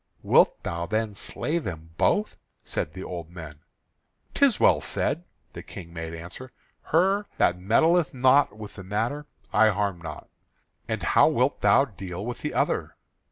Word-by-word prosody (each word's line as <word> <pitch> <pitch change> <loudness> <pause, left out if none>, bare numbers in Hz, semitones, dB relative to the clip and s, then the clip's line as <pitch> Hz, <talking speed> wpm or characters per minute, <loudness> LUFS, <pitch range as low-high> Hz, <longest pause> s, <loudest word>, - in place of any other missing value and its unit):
"Wilt - - +4
thou 85 0 -3
then 110 +2 -1
slay 150 +10 -2
them 80 - -7
both?" 210 +1 +1 0.3
said 75 - -3
the 95 - -7
old 85 -3 -6
men. 80 -4 -10 0.7
"'Tis 280 -5 +3
well - - +4
said," 170 +5 -2 0.3
the - - -7
King 85 -3 -11
made 80 0 -6
answer. 90 +10 -9 0.3
"Her 195 +5 +2
that 90 0 +2
meddled 160 - +3
not 130 -2 +3
with 105 -1 -10
the 100 - -8
matter 115 +10 -2 0.3
I 110 - +6
harm 100 -3 -1
not." 80 -2 -8 0.6
"And - - -3
how - - +5
wilt - - +1
thou 135 - +5
deal 95 -4 -7
with 120 0 -5
the - - -3
other?" - - 0
105 Hz, 160 wpm, -26 LUFS, 85-140 Hz, 0.7 s, I